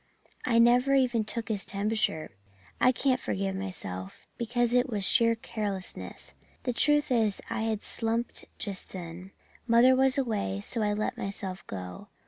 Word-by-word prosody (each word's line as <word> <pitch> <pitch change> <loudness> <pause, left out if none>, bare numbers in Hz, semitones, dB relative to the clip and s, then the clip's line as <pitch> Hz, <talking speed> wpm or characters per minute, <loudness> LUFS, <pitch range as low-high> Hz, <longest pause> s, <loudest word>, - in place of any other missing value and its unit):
I 230 -2 +3
never 245 +4 +5
even 250 -4 +3
took 225 +1 -4
his 205 -3 0
temperature, 200 -6 -1 0.5
and - - +4
I - - +7
can't 260 0 +1
forgive 195 -2 -2
myself, 95 - -6
because 240 0 0
it 250 +1 +3
was 210 -4 -1
sheer 230 0 +4
carelessness. 205 -4 -5 0.3
The 250 - -1
truth 295 +3 +3
is 220 -5 +2
I - - -1
had 220 -2 -1
slumped 230 +1 -1
just 200 -4 -5
then. 180 0 -7 0.4
Mother 240 +2 +6
was 265 +1 +3
away, 210 - -1
so 225 - -1
I 210 -1 +1
let 210 +1 -2
myself 190 -2 -5
go. 90 -2 -7
220 Hz, 155 wpm, -29 LUFS, 195-240 Hz, 0.5 s, I